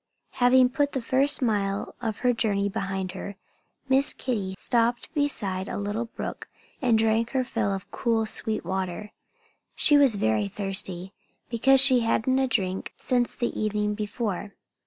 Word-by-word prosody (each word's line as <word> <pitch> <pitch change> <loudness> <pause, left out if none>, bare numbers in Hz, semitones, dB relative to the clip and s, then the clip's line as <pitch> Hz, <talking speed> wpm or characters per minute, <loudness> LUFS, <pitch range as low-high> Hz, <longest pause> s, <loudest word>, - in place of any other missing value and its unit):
Having 250 +1 +5
put 285 +2 0
the 265 - 0
first 275 +3 +2
mile 200 -3 -1
of 225 -3 -2
her 245 - +5
journey 200 -3 0
behind 190 -1 -3
her, 200 +2 -7 0.5
Miss 270 +1 +2
Kitty 200 -7 -3
stopped 235 +1 0
beside 205 - -1
a - - -4
little 205 +3 -2
brook 230 - -7 0.3
and 240 -4 +3
drank 225 +2 +1
her 260 -1 +2
fill 230 -5 -1
of 195 -1 -5
cool, 225 -2 0
sweet 215 -2 -2
water. 190 +2 -3 0.6
She 295 - +4
was 270 -6 +5
very 110 - +1
thirsty, 190 - -3 0.4
because 265 +3 +4
she 265 -2 +6
hadn't 235 +3 +1
had 265 - +3
a - - -2
drink 190 -6 -2
since 245 -1 0
the 240 - -1
evening 210 -1 -1
before. 210 -2 -4
220 Hz, 155 wpm, -26 LUFS, 195-250 Hz, 0.6 s, she